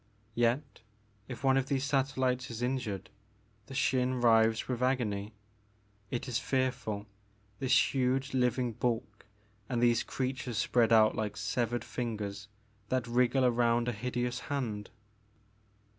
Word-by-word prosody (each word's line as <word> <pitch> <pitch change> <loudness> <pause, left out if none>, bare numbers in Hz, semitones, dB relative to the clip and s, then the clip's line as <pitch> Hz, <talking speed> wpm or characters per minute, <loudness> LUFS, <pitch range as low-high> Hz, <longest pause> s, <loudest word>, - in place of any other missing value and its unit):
Yet 120 +5 0 0.5
if 130 -1 -8
one 135 0 +4
of 135 -1 0
these 135 -2 0
satel 135 -1 0
lites 125 0 0
is 115 0 -5
injured 125 -7 -2 0.6
the 135 - -8
Xin 130 -1 +1
writhes 115 -1 +4
with 125 -1 -2
agony. 110 -5 0 0.7
It 120 +2 -3
is 120 -2 0
fearful 125 -6 -1 0.3
— 105 +3 -35
^this 130 - +4
huge 135 +1 0
living 125 -1 +1
bulk 110 -3 -3 0.4
and 125 -2 0
these 120 -1 +4
creatures 130 -3 -3
spread 115 +1 +2
out 110 -1 +6
like 105 -2 -3
severed 115 +3 -1
fingers 105 -4 -4 0.4
that 130 -2 0
wriggle 125 +2 +2
around 120 -1 +2
a - - +1
hideous 125 +2 -2
hand.'' 115 -8 -3
120 Hz, 135 wpm, -31 LUFS, 110-130 Hz, 0.7 s, out